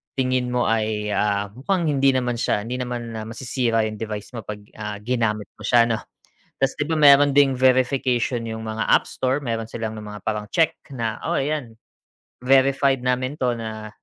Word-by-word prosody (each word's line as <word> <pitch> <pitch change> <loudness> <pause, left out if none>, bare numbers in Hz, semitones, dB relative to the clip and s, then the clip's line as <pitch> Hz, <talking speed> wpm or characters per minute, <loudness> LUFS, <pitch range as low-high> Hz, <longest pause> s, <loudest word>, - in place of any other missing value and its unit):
tingin 130 -1 0
mo 125 -1 +1
ay, 110 -1 0
ah, 100 -1 0
mukhang 160 - -1
hindi 135 -2 +3
naman 125 -2 0
siya 105 - 0
hindi 120 +4 -4
naman 120 -2 -4 0.2
masisira 120 -1 -1
yung 110 - -8
device 105 -2 -5
mo 110 - -7
'pag, 105 0 -6 0.2
ah, 105 -1 -5
ginamit 110 -4 -1
mo - - -10
siya 120 +2 +4
'no. 115 - +1 0.6
'Tas 135 - +1
'di 150 - -2
ba 160 - +1
meron 145 -1 +7
ding 140 -1 +4
verification 130 -1 +2
yung 110 0 -5
mga 110 0 -2
app - - +4
store, 130 +1 -1
meron 115 -5 -4
silang 110 -1 -4
nung 105 -1 -8
mga 105 - -7
parang 105 -1 -2
check 165 -1 +2 0.2
na 115 -4 -3
oo - - +1
ayan 135 -6 -3 0.7
verified 135 0 +3
namin 125 +2 -1
'to 125 -2 +1
na 110 -1 -6
120 Hz, 185 wpm, -23 LUFS, 110-130 Hz, 0.7 s, meron